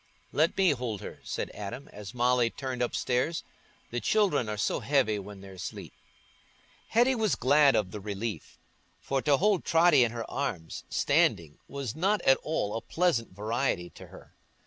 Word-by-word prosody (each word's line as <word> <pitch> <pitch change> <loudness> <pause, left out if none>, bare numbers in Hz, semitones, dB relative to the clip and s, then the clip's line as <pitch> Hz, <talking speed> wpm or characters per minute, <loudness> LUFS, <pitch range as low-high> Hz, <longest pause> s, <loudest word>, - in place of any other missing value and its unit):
"Let 160 +5 +2
me 190 -2 +4
hold 120 -7 -3
her," - - -8
said - - -4
Adam, 105 +7 -7
as 105 +3 -10
Molly 125 -1 +3
turned 130 0 -5
upstairs; 125 +5 0 0.5
"the 120 - -1
children 180 - +2
are 105 - -3
so 105 - 0
heavy 130 -7 +1
when 100 0 -10
they're 95 0 -11
asleep." 90 -3 -7 0.9
Hetty 240 +4 +3
was 220 -5 +1
glad 140 +2 +4
of 95 -4 0
the 105 - -6
relief, 105 +2 -5 0.4
for 135 -1 -1
to 145 0 +3
hold 200 +1 +2
Totty 165 -5 +5
in 115 - 0
her 115 -1 -5
arms, 100 - -4
standing, 80 -3 +1
was 140 -4 -5
not 195 +6 +2
at 135 - +5
all 130 -10 -2
a 115 - -2
pleasant 160 - 0
variety 105 -4 -1
to - - -12
her. - - -15
125 Hz, 170 wpm, -29 LUFS, 105-150 Hz, 0.9 s, Totty